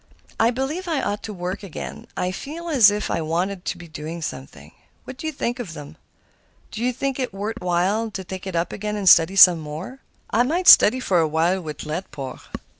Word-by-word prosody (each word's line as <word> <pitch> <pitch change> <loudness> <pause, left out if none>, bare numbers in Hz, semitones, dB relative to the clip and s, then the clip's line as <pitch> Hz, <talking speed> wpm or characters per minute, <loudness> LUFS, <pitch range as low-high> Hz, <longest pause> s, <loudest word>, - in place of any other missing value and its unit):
"I 225 - +4
believe 270 +9 -3
I 320 -4 0
ought 205 +1 -2
to 215 - -6
work 185 +1 -5
again. 195 -6 -8
I 180 - -1
feel 315 - -7
as 250 -9 +6
if 210 +1 -3
I - - -1
wanted 175 +4 -2
to - - -3
be 175 -1 -11
doing 155 +2 -7
something. 135 -3 -8 0.3
What 255 - -10
do 315 - -5
you - - -1
think 245 -3 -3
of 200 -9 -6
them? 150 +1 -10 0.8
Do 220 - -6
you 250 - +2
think 270 +2 -3
it 255 - -2
worth 210 +4 -5
while 185 +6 0
to 195 -3 -6
take 190 +1 -8
it 190 - -5
up 170 +1 -1
again 210 +1 -4
and 200 -2 -3
study 170 +2 +6
some 180 -3 +8
more? 160 - -8 0.3
I 225 - +3
might 335 +9 0
study 255 +5 +8
for 190 -8 +1
a 160 - +2
while 165 +5 +1
with 150 -3 -7
Laidpore." 150 -5 -6
195 Hz, 215 wpm, -22 LUFS, 170-240 Hz, 0.8 s, some